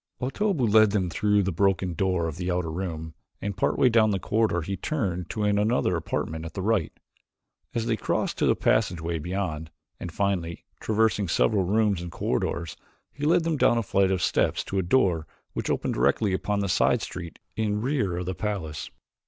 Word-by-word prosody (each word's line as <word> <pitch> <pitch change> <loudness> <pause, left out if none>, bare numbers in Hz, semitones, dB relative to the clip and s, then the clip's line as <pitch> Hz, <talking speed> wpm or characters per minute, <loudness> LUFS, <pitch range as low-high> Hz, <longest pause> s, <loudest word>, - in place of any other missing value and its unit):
Otobu 140 - 0
led 110 0 +6
them 95 -4 0
through 105 +2 +2
the 95 - -1
broken 95 0 +1
door 90 0 0
of 80 - -5
the 90 0 -3
outer 90 -2 -1
room, 80 -2 -4 0.3
and 100 -1 -3
part 100 - 0
way - - +5
down 110 -2 +4
the 100 - +1
corridor 105 -3 0
he 100 +5 -3
turned 95 - -2
into 105 +6 -3
another 105 -1 +2
apartment 80 0 -3
at 80 0 -8
the 95 - -3
right. 100 -6 +1 0.8
This 115 -1 -1
they 115 -2 0
crossed - - -1
to - - +3
a - - +4
passageway 85 -1 +1
beyond, 80 -2 -3 0.3
and, 90 - -6
finally, 90 -3 -2
traversing 110 -2 +1
several 95 +3 +2
rooms 105 -1 +2
and 85 -1 -6
corridors, 85 0 -2 0.4
he 145 - -4
led 170 +1 +4
them 165 -2 0
down 120 - +4
a 115 - +1
flight 95 -1 +2
of 95 -2 0
steps - - +1
to 95 - -2
a - - +3
door 90 -5 +2 0.3
which - - -3
opened - - 0
directly 100 -4 +2
upon 100 +2 -1
a - - -1
side - - +2
street 85 -3 -7 0.2
in 105 -2 0
rear 120 -10 0
of 90 - -3
the 95 - -2
palace. 90 -6 -4
95 Hz, 195 wpm, -26 LUFS, 85-110 Hz, 0.8 s, led